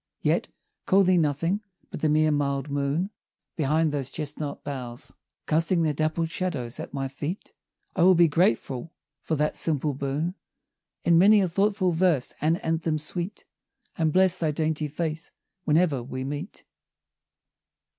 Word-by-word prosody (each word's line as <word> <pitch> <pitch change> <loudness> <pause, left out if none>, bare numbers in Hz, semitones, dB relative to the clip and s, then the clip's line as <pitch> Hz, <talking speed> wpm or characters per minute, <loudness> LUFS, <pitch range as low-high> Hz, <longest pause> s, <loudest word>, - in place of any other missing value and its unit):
Yet, - - +1 0.4
call 195 +1 +5
thee 185 -1 +4
nothing 165 +6 0 0.3
but - - -6
the 155 - +2
mere 155 +1 +3
mild 140 -1 -1
Moon, 145 +7 -1 0.4
Behind 155 +1 +1
those 140 -3 -2
chestnut 150 -2 -5
boughs, 130 -3 -6 0.3
Casting 165 +2 +2
their 155 -2 +1
dappled 155 +2 -1
shadows 145 -11 -3
at - - -6
my 135 -1 -2
feet; 145 +7 -6 0.4
I 180 - 0
will 185 +1 +7
be 170 0 +6
grateful 145 -2 0 0.3
for 160 - -1
that 150 +1 0
simple 150 -2 +1
boon, 140 +6 -2 0.7
In 170 -1 +5
many 205 +3 +7
a 190 - +2
thoughtful 195 +1 +1
verse 165 -6 +1
and 160 +2 +2
anthem 160 -1 0
sweet, 175 +5 -5 0.5
And 160 -3 +1
bless 185 +1 +4
thy 160 - +1
dainty 155 0 -1
face 155 +1 -4 0.4
when'er 155 -4 +2
we 130 +2 -5
meet. 145 +8 -6
155 Hz, 145 wpm, -26 LUFS, 145-170 Hz, 0.7 s, will